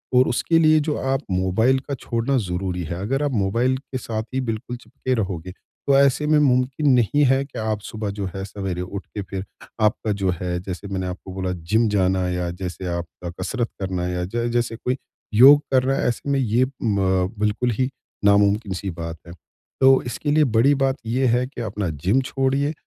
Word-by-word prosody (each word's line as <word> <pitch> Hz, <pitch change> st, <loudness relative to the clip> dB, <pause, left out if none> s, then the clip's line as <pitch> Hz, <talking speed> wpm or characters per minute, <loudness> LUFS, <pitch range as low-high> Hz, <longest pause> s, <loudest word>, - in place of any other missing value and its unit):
और 125 Hz, +1 st, +6 dB
उसके 165 Hz, +7 st, +2 dB
लिए 155 Hz, -1 st, +5 dB
जो 150 Hz, 0 st, -1 dB
आप 135 Hz, +1 st, 0 dB
मोबाइल 95 Hz, +8 st, +2 dB
का 140 Hz, -, -6 dB
छोड़ना 120 Hz, +2 st, -1 dB
ज़रूरी 90 Hz, -3 st, -2 dB
है, 85 Hz, +1 st, -4 dB
अगर 135 Hz, +8 st, -1 dB
आप 145 Hz, -, 0 dB
मोबाइल 115 Hz, +4 st, +1 dB
के 130 Hz, -1 st, -7 dB
साथ 110 Hz, -3 st, -3 dB
ही 130 Hz, -, 0 dB
बिल्कुल 120 Hz, 0 st, -4 dB
चिपके 130 Hz, +1 st, -4 dB
रहोगे, 95 Hz, -5 st, -3 dB
तो 135 Hz, +8 st, -2 dB
ऐसे 140 Hz, +2 st, +3 dB
में 155 Hz, 0 st, +4 dB
मुमकिन 130 Hz, +1 st, +2 dB
नहीं 145 Hz, +6 st, +2 dB
है 135 Hz, +1 st, +3 dB
कि 140 Hz, -, -8 dB
आप 110 Hz, -1 st, -2 dB
सुबह 110 Hz, 0 st, -5 dB
जो 100 Hz, -, -1 dB
है 95 Hz, -, -4 dB
सवेरे 95 Hz, -3 st, -4 dB
उठ 95 Hz, +2 st, -6 dB
के 105 Hz, -, -6 dB
फिर 95 Hz, 0 st, -6 dB, 0.4 s
आपका 105 Hz, 0 st, +1 dB
जो 95 Hz, -, +2 dB
है 90 Hz, -1 st, -2 dB
जैसे 95 Hz, +2 st, -6 dB
मैंने 95 Hz, -2 st, -3 dB
आपको 90 Hz, +1 st, -7 dB
बोला 95 Hz, -1 st, -2 dB, 0.2 s
जिम 115 Hz, +1 st, +4 dB
जाना 95 Hz, -2 st, +1 dB
या 90 Hz, -1 st, -2 dB
जैसे 90 Hz, 0 st, -4 dB
आपका 85 Hz, +1 st, -7 dB
कसरत 115 Hz, +5 st, -2 dB
करना 90 Hz, -2 st, -2 dB
या 90 Hz, 0 st, -2 dB
ज 115 Hz, +5 st, -2 dB
जैसे 120 Hz, -1 st, 0 dB
कोई 125 Hz, +3 st, -2 dB, 0.4 s
योग 135 Hz, +6 st, +8 dB
कर 130 Hz, -1 st, +4 dB
रहा 135 Hz, +1 st, +1 dB
है, -, -, 0 dB
ऐसे 125 Hz, +3 st, -2 dB
में 140 Hz, -, +2 dB
ये 120 Hz, 0 st, +2 dB, 0.2 s
म 95 Hz, -4 st, +1 dB
बिल्कुल 105 Hz, +4 st, +1 dB
ही 130 Hz, +3 st, 0 dB, 0.4 s
नामुमकिन 100 Hz, 0 st, +3 dB
सी 95 Hz, +1 st, -4 dB
बात 85 Hz, -1 st, -6 dB
है। 85 Hz, -, -9 dB, 0.5 s
तो 135 Hz, 0 st, +6 dB
इसके 120 Hz, +5 st, -2 dB
लिए 155 Hz, +1 st, +4 dB
बड़ी 130 Hz, +6 st, +5 dB
बात 135 Hz, -1 st, +1 dB
ये 125 Hz, +4 st, 0 dB
है 125 Hz, +1 st, +2 dB
कि 130 Hz, -2 st, -8 dB
अपना 105 Hz, -4 st, -3 dB, 0.2 s
जिम 115 Hz, +8 st, +4 dB
छोड़िए। 135 Hz, +2 st, 0 dB
110 Hz, 200 wpm, -22 LUFS, 95-130 Hz, 0.5 s, योग